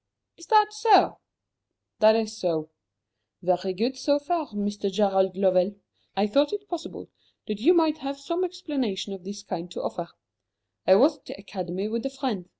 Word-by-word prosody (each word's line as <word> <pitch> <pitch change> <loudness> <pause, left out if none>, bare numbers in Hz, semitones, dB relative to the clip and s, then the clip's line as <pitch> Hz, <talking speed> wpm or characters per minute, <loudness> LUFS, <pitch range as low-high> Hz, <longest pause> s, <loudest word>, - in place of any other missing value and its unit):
"Is 335 - -15
that 425 -1 +4
so?" 425 -1 +4 0.8
"That 215 0 +7
is 220 -1 -1
so." 160 -6 -2 0.7
"Very 180 +1 +1
good, 230 +8 -1
so 285 +2 +2
far, 315 +1 -2
Mr. 205 -1 -3
Gerald 190 -2 +2
Lovell. 190 0 +3 0.4
I 200 - +3
thought 280 +8 +2
it 410 0 -5
possible 345 -3 -7 0.3
that 210 -2 -4
you 345 +9 +5
might 315 -2 +3
have 275 0 -4
some 335 +6 -2
explanation 275 - -3
of 190 -2 -9
this 200 +2 -8
kind 180 -3 -5
to 175 - -6
offer. 170 -1 -4 0.8
I 185 - +8
was 290 +8 +5
at - - -40
the - - -8
Academy 190 -1 -4
with 230 +1 -3
a - - -4
friend. 255 -10 -4
215 Hz, 170 wpm, -26 LUFS, 190-295 Hz, 0.8 s, I